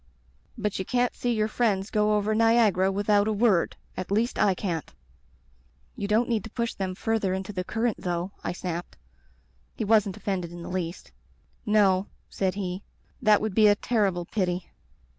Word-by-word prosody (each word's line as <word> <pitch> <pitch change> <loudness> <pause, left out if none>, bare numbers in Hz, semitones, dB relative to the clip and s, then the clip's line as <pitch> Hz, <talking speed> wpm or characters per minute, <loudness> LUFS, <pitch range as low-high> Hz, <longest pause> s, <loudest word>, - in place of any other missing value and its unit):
*But 210 -2 -2
you - - -1
can't 245 +4 +1
see 245 - -1
your 215 -2 +1
friends 215 -4 0
go 210 0 +2
over 210 +1 0
Niagara 220 -4 +4
without 205 +1 +2
a - - +2
word; 210 -4 +2 0.2
at 185 - -5
least 220 +5 0
I 195 -2 +4
can't.* 170 -5 -3 1.0
"*You 200 - -3
don't 220 +4 +2
need 225 -5 0
to - - -8
push 235 +1 -2
them 185 -1 -3
further 205 -2 0
into 190 +2 -5
the 185 -1 -2
current, 225 +3 -1
though,' 175 +1 -2
I - - -1
snapped. 175 -1 -5 0.8
He 220 - -2
wasn't 210 -3 +3
offended 180 -4 -3
in 175 0 -8
the - - -7
least. 180 -1 -4 0.6
"*No,' 200 -2 +3 0.2
said 190 -1 -1
he. 185 -1 -3 0.4
*That 215 -3 +5
would 215 -2 -2
be 215 +1 +6
a 205 - +6
terrible 200 -6 0
pity.' 180 -2 -2
205 Hz, 175 wpm, -26 LUFS, 185-220 Hz, 1.0 s, be